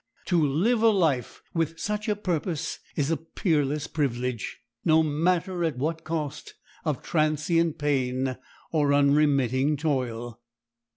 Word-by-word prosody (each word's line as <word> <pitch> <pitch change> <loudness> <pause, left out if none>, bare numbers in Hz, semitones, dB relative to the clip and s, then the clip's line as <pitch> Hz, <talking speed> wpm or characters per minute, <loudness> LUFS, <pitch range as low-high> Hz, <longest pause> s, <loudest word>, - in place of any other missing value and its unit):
To 175 -4 +2
live 185 - +2
a 225 - +6
life 160 - +1
with 165 -1 -1
such 210 +4 -2
a 210 - +2
purpose 170 -5 -2 0.2
is 145 0 0
a 165 - +2
peerless 150 -3 0
privilege, 125 -6 -2 0.2
no 160 -1 +5
matter 170 +4 0
at 160 -5 -1
what 160 +4 -2
cost 155 -3 -4 0.3
of 150 -5 -2
transient 155 +1 +1
pain 130 -3 0 0.4
or 145 -3 +2
unremitting 140 -1 +3
toil. 120 -6 -2
150 Hz, 125 wpm, -26 LUFS, 140-165 Hz, 0.4 s, a